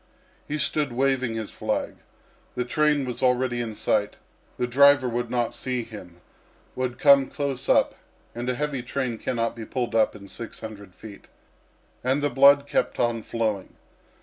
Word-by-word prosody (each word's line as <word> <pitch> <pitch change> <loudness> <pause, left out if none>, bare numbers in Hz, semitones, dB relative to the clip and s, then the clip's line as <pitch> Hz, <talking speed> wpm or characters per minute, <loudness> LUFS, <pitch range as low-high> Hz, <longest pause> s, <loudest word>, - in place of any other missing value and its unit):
He 150 - -2
stood 145 0 +1
waving 130 -2 0
his 110 -2 -5
flag. - - -3 0.6
The 125 - -1
train 150 +1 +2
was 125 -1 -5
already 125 -1 +1
in 110 -2 -5
sight. 105 0 0 0.4
The 125 - 0
driver 140 +1 +5
would 120 0 -2
not 120 -1 -1
see 125 -2 -2
him 90 -6 -12 0.5
would 130 -1 -2
come 140 -1 +6
close 140 -2 -3
up, - - +4 0.4
and 120 +2 -4
a 125 - 0
heavy 145 -1 -2
train 125 -2 -3
cannot 115 -3 -2
be 115 - -7
pulled 120 +1 -3
up 110 -1 +2
in 100 -1 -11
six 115 +4 -8
hundred 100 -4 -9
feet. 105 -3 -12 0.8
And 135 +3 +1
the 145 - +1
blood 140 +1 +6
kept - - -1
on 120 -1 +1
flowing. 110 -4 -3
125 Hz, 165 wpm, -25 LUFS, 115-135 Hz, 0.8 s, come